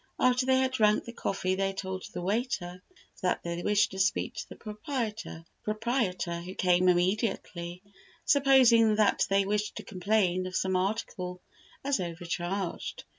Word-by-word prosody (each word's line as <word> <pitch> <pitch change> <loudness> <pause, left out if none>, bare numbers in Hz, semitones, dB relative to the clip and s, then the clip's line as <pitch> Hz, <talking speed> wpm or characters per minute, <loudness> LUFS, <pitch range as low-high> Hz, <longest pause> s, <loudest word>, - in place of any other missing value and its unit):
After 255 0 +3
they 260 0 +4
had 260 0 +1
drank 215 -4 +3
the 235 - -8
coffee 185 -4 -1
they 195 +1 0
told 190 -1 -5
the 175 - -5
waiter 195 -4 -2 0.4
that 180 -2 0
they 170 0 -3
wished 210 +2 +2
to 190 - -6
speak 200 +4 +1
to 220 - -7
the - - -9 1.1
proprietor, 215 -6 -1
who 185 +2 -8
came 180 0 +3
immediately, 180 -1 -1 0.4
supposing 260 -7 +5
that 210 -1 +3
they 195 0 +3
wished 210 +1 -1
to - - -6
complain 185 -1 0
of 185 - -7
some 190 -1 0
article 185 -2 -2 0.4
as 280 0 +1
overcharged. 175 +2 -4
195 Hz, 145 wpm, -29 LUFS, 180-220 Hz, 1.1 s, supposing